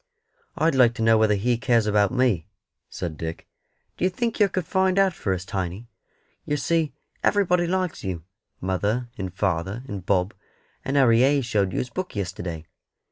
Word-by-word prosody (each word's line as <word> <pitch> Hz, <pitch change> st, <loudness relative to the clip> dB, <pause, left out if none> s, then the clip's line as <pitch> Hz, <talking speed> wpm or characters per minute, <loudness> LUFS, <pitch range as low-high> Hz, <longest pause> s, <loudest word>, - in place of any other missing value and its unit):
"I'd 160 Hz, 0 st, +2 dB
like 125 Hz, -3 st, +4 dB
to 115 Hz, -, -2 dB
know 110 Hz, 0 st, +5 dB
whether 110 Hz, -1 st, +4 dB
He 115 Hz, +4 st, 0 dB
cares 120 Hz, -3 st, +2 dB
about 105 Hz, -1 st, +3 dB
me," 125 Hz, -10 st, +1 dB, 0.4 s
said 80 Hz, -3 st, -5 dB
Dick. 80 Hz, 0 st, -5 dB, 0.5 s
"D'ye 185 Hz, -, +2 dB
think 230 Hz, +5 st, -2 dB
yer 205 Hz, -, +6 dB
could 185 Hz, -3 st, -3 dB
find 190 Hz, 0 st, +1 dB
out 195 Hz, -2 st, +4 dB
for 100 Hz, -, -3 dB
us, 95 Hz, 0 st, -2 dB
Tiny? 95 Hz, +4 st, -4 dB, 0.5 s
Yer 145 Hz, -, -1 dB
see 165 Hz, 0 st, 0 dB, 0.3 s
everybody 180 Hz, -4 st, +3 dB
likes 185 Hz, -1 st, -1 dB
you 90 Hz, -4 st, -4 dB, 0.4 s
mother, 105 Hz, +6 st, -1 dB
and 95 Hz, -2 st, -3 dB
father, 95 Hz, +4 st, -2 dB
and 100 Hz, -7 st, -6 dB
Bob; 90 Hz, +1 st, +1 dB, 0.5 s
and 140 Hz, +2 st, -1 dB
Harry 115 Hz, -4 st, +5 dB
Hayes 135 Hz, +1 st, +3 dB
showed 100 Hz, -5 st, +1 dB
you -, -, -4 dB
his 125 Hz, -, -2 dB
book 185 Hz, -7 st, -5 dB
yesterday. 85 Hz, -4 st, -4 dB
115 Hz, 175 wpm, -24 LUFS, 95-155 Hz, 0.5 s, yer